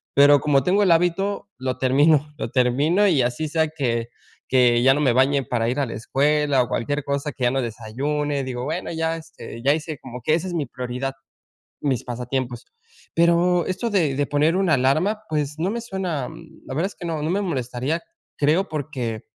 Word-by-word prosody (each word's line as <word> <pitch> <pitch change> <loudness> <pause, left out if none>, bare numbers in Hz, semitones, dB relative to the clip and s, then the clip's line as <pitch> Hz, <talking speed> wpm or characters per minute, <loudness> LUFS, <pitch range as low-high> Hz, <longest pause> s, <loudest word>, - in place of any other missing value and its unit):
pero 145 +1 +7
como 140 -3 +3
tengo 195 +7 +3
el 185 - +4
hábito, 195 +4 +1
lo 130 -1 -3
termino, 145 +3 +3
lo - - -4
termino 145 +10 +3
y 155 -9 +3
así 125 +6 -1
sea 160 0 +1
que 120 -6 -2 0.4
que 125 -2 +4
ya 135 - +6
no 145 - -1
me 130 -5 +3
bañe 135 +2 +3
para 115 -3 -1
ir 130 +4 -1
a 140 - +1
la - - -6
escuela 145 +4 +2
o - - -6
cualquier 145 +6 -1
cosa 140 +1 -2
que 130 - -6
ya 120 - +4
no 135 0 0
desayune, 135 +6 -2
digo 125 -1 -4
bueno, 160 +5 -3
ya, 165 0 -1
este, 140 -7 -10
ya 140 +2 +4
hice, 155 -1 -4
como 125 -1 -9
que 155 +7 +2
esa 180 +3 -2
es 180 - -5
mi 160 -4 -1
prioridad, 125 +2 -4 0.7
mis 135 -4 0
pasatiempos, 125 0 -4 0.5
pero 170 +1 +3
esto 190 +6 -2
de 165 -10 +1
de 145 +1 +1
poner 150 +4 +2
una 190 -4 +3
alarma, 155 +12 +1
pues, 150 -1 -1
no 185 +5 0
me 235 - -3
suena, 185 - -3 0.4
la 130 - -6
verdad 170 +6 +1
es - - -11
que 175 - -7
no 160 -2 -2
no 155 - -1
me 200 +3 0
molestaría, 135 -2 -2 0.4
creo, 160 +7 +2
porque, 130 -7 -4
145 Hz, 200 wpm, -23 LUFS, 130-165 Hz, 0.7 s, pero